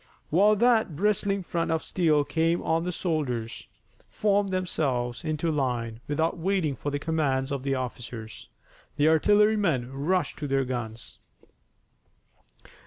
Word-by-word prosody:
While 205 +6 +5
that 220 -6 +3
bristling 200 +2 0
front 170 -1 -2
of 160 0 0
steel 155 -5 +2
came 165 +4 0
on 165 +1 0
the 180 - -1
soldiers 140 -11 -3 0.4
formed 205 -1 +1
themselves 140 -10 -1
into 155 +1 -1
line 120 -6 -2
without 160 +3 0
waiting 175 -5 0
for 145 - -4
the 145 - -2
commands 145 -3 -1
of 140 -2 -2
the 135 0 -1
officers. 120 -3 -7 0.5
The 145 - +3
artillerymen 180 - +3
rushed 160 +4 -1
to 150 - -3
their 135 -1 +1
guns. 120 -3 -6
155 Hz, 130 wpm, -27 LUFS, 130-180 Hz, 0.5 s, While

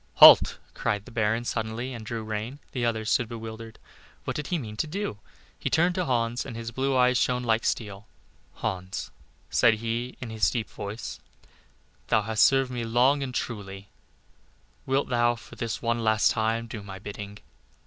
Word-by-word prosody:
"Halt," - - +9 0.2
cried 105 0 -1
the - - -12
baron 115 +1 0
suddenly, 115 +3 -3
and 115 -2 -7
drew 110 +1 -4
rein. 110 +5 -4
The 125 - -2
others 110 -2 0
stood 120 -3 +2
bewildered. 115 -1 -8 0.5
What - - -3
did 150 - -3
he 180 - 0
mean 110 -8 -6
to 155 - 0
do? 175 - -4 0.4
He - - -1
turned 175 +2 +3
to 180 0 -1
Hans 120 -2 0
and 115 - -7
his 115 0 -5
blue 130 +2 0
eyes 125 0 +4
shone 125 0 +1
like 115 -1 +2
steel. 100 -2 -2 0.5
"Hans," 95 0 -4 0.4
said 115 -2 +5
he, 115 +3 -3
in 120 -3 -6
his 110 -1 +2
deep 115 -5 -3
voice, 105 +2 -6 0.9
"thou 110 -1 +3
hast 110 0 +3
served 135 -1 +3
me 120 -1 -3
long 125 +5 +3
and 135 -2 -3
truly; 100 -5 -5 1.0
wilt 135 +2 +1
thou 120 -1 +3
for 110 - -13
this 115 0 -4
one 115 0 0
last 110 0 +4
time 115 +1 0
do 110 -2 -7
my 95 -1 -8
bidding?" 100 +1 -7
115 Hz, 180 wpm, -27 LUFS, 110-125 Hz, 1.0 s, Halt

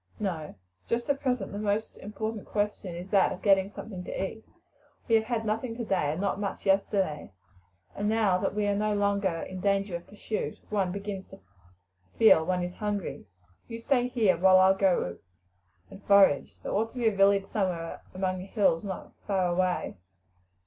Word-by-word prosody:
"No. 175 -7 -3 0.3
Just 235 +4 0
at 275 - -2
present 250 -7 -1
the 205 - -5
most 210 +1 -1
important 215 +1 -5
question 205 -4 -2
is 175 +2 -7
that 195 -2 +4
of 180 - -7
getting 195 -1 +4
something 195 -4 -7
to 190 +1 -3
eat. 220 - -14 0.6
We 230 - 0
have 220 -1 +4
had 225 -1 -2
nothing 225 +2 -2
today 190 -10 0
and 160 - -5
not 200 0 -1
much 200 -1 -4
yesterday, 195 - +1 0.6
and 205 +1 -1
now 215 -5 +2
that 195 - -2
we 210 -1 0
are 205 0 +1
no 210 +1 0
longer 200 -1 +1 0.2
in 185 0 -7
danger 195 -1 0
of 170 - -7
pursuit 210 +1 -4
one 195 -4 +1
begins 200 0 -5
to - - -13 0.8
feel 220 -8 +6
one 180 +1 0
is 180 0 -4
hungry. 205 - -3 0.4
You 230 - -6
stay 245 +1 +1
here 225 -7 +2
while 185 +1 +6
I 190 +1 +6
go 190 - +1 0.7
and 200 - -12
forage. 195 -8 +4
There - - -4
ought 220 +2 +1
to - - -11
be 235 -2 +2
a 215 - +2
village 195 0 +4
somewhere 180 -6 -3
among 185 0 -1
the 185 - -7
hills 195 -6 +2
nor 195 -2 -6 0.2
far 190 -2 +1
away." 180 - 0
200 Hz, 185 wpm, -28 LUFS, 185-215 Hz, 0.8 s, feel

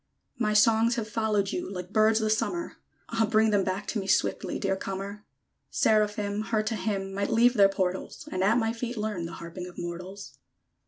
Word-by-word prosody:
My 215 -3 +1
songs 225 +2 +4
have 225 -2 -3
followed 210 -2 0
you, 355 - -4
Like 180 0 -7
birds 220 0 +4
the 215 0 +1
summer; 340 +10 -1 0.3
Ah! 225 -1 +1
bring 220 0 +4
them 205 -2 +3
back 190 +2 -2
to 220 - -1
me, 195 - -5
Swiftly, 195 - +1
dear 195 -1 0
comer! 195 +2 -5 0.5
_Seraphim, 210 -1 +1
Her 220 -2 +1
to 220 +1 -2
hymn, 195 -2 -2
Might 200 +1 -1
leave 240 +2 +4
their 200 -4 +6
portals; 190 -1 -3
And 185 0 -1
at 215 +4 +4
my 225 -1 +1
feet 240 +1 -4
learn 210 -6 -2
The 170 - -9
harping 170 +2 -7
of 180 - -12
mortals! 180 +3 -7
210 Hz, 195 wpm, -28 LUFS, 195-220 Hz, 0.5 s, their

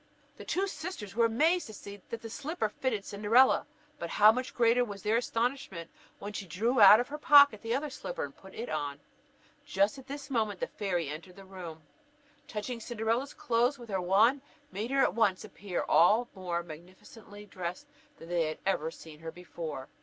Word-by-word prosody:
The - - -10
two 385 +2 0
sisters 315 - -6
were 230 0 +4
amazed 315 +10 +2
to 220 - -10
see 200 0 -10
that 230 0 -6
the 225 - -6
slipper 285 -3 -3
fitted 220 -3 -2
Cinderella; 215 +6 +3 0.3
but 170 - -4
how 210 +4 +7
much 255 +3 -4
greater 240 0 +4
was 205 -4 -7
their 215 +1 +2
astonishment 230 -8 -2 0.3
when 205 +1 -7
she 195 - -6
drew 225 +8 +1
out 205 +2 +10
of 245 - -2
her 300 +1 -6
pocket 285 -7 +7
the 230 +1 -1
other 290 +1 -3
slipper - - -5
and - - -7
put 190 0 -15
it 235 - -5
on! 145 -1 -3 0.6
Just 200 +7 +1
at 265 - -14
this 280 0 -7
moment 215 -6 0
the - - 0
fairy 180 -6 -2
entered 160 +5 -8
the 195 - -13
room, 175 -5 -9 0.6
and - - -35
touching 230 +3 -4
Cinderella's 230 +4 -2
clothes 245 +4 +1
with 240 -3 -12
her 190 -2 -1
wand, 215 +9 +3 0.3
made 215 +4 -4
her 275 0 +2
all - - +6
at - - 0
once 205 -4 +1
appear 190 -3 -4
more 180 0 +2
magnificently 185 +5 -13
dressed 185 +5 -6 0.3
than 165 - -12
they 170 -2 +1
had 155 - -4
ever 160 -5 0
seen 160 -2 -13
her 165 0 -7
before. 160 -5 -7
210 Hz, 195 wpm, -30 LUFS, 180-245 Hz, 0.6 s, out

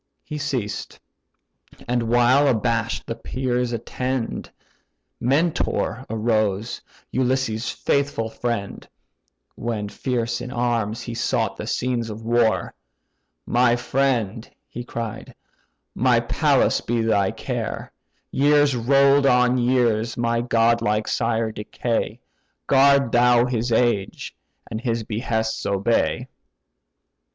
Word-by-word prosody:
He 150 - -6
ceased; 130 -8 -4 0.9
and 120 -1 0
while 120 +4 +4
abash'd 115 -2 0
the - - -3
peers 125 0 -2
attend, 125 +1 -3 0.7
Mentor 135 -2 0
arose, 110 -1 0 0.3
Ulysses' 130 -3 0
faithful 140 -5 0
friend: 115 -3 -4 0.6
(When 110 -3 -3
fierce 120 +1 -2
in 125 - -6
arms 120 -3 -1
he 120 - -6
sought 115 - -1
the - - -7
scenes 120 -2 -1
of 110 +1 -7
war, 115 -1 +1 0.7
"My 120 0 +3
friend 120 -4 -1 0.2
(he 120 - -7
cried), 115 -2 -6 0.6
my - - +3
palace - - +2
be 120 0 -1
thy 100 -4 +2
care; - - -4 0.4
Years 145 0 +3
roll'd 140 +3 +4
on 125 0 +4
years 120 -3 +1
my 115 0 +1
godlike 115 -2 +2
sire 110 0 0
decay, 110 +2 -3 0.5
Guard 140 -2 +4
thou 120 0 +5
his 120 -1 -1
age, 110 -4 0 0.3
and 110 - -5
his 115 -2 -1
behests 110 0 -2
obey.") 100 +4 0
120 Hz, 105 wpm, -23 LUFS, 110-125 Hz, 0.9 s, thou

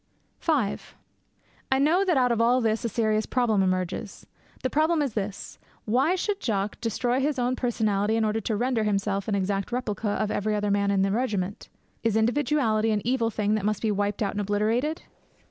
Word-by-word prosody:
V 330 - +1 1.2
I 265 - +4
know 315 +8 +3
that 360 -6 +2
out 250 -2 +3
of 230 -1 +1
all 245 +2 +4
this 220 -2 0
a 235 - -1
serious 215 -1 0
problem 235 -5 +2
emerges. 185 +1 -2 0.4
The 260 - +1
problem 315 +2 +2
is 280 -6 -1
this: 205 -2 -5 0.3
why 260 - +2
should 400 +2 -2
Jock 205 - -2
destroy 240 +2 0
his 285 +1 0
own 250 0 0
personality 220 -4 0
in 225 -1 +2
order 215 +1 0
to 220 - -1
render 240 0 0
himself 200 -1 -1
an 210 - 0
exact 195 +1 -1
replica 220 -4 -2
of 210 +1 -1
every 210 +1 0
other 205 -1 0
man 200 0 +1
in 195 -1 +2
the 195 - +1
regiment? 205 -4 -2 0.3
Is 225 -2 0
individuality 230 -2 +2
an 210 -1 0
evil 240 -2 +1
thing 210 -1 0
that 215 -2 0
must 210 0 -1
be 220 - +2
wiped 205 +1 -1
out 200 - 0
and 205 - -3
obliterated? 220 +9 0
220 Hz, 195 wpm, -26 LUFS, 205-250 Hz, 1.2 s, I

